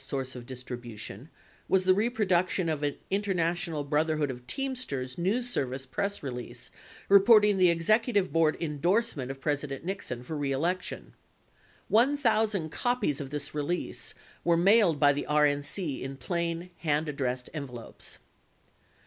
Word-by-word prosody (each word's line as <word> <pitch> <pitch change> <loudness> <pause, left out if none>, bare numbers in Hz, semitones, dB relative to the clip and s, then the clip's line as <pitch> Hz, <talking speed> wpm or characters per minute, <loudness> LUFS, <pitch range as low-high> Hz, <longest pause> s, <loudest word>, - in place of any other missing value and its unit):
154 135 -2 -3
source - - -8
of 120 -1 -9
distribution 120 -1 -7 0.4
was 190 -1 +3
the 185 0 +5
reproduction 185 -5 +1
of 155 -2 -1
an 145 -1 0 0.2
International 175 -5 0
Broth 150 +2 +1
erhood 155 -3 0
of 125 -1 -10
Teamsters 175 - -3
news 220 +8 +1
service 130 - -2
press 200 +9 -3
release 125 -2 -7 0.4
reporting 205 0 +6
the 180 -1 +6
executive 205 +4 +2
board 165 -1 +3
endorsement 165 - 0
of 135 0 -6
President 145 0 -2
Nixon 150 -10 -4
for 155 +5 -5
re 145 -2 -1
election. 175 +7 -2 0.7
One 255 +7 +4
thousand 215 - +1
copies 245 - 0
of 135 - -6
this 145 0 -4
release 150 +4 -3 0.3
were 170 -1 +3
mailed 190 -3 +5
by 145 -1 +6
the 145 - -4
RNC 150 +1 +1
in 135 +1 -5
plain, 170 +5 -3
hand 155 -1 0
addressed 130 -4 -3
envelopes. 130 -7 -6
160 Hz, 140 wpm, -29 LUFS, 135-195 Hz, 0.7 s, reporting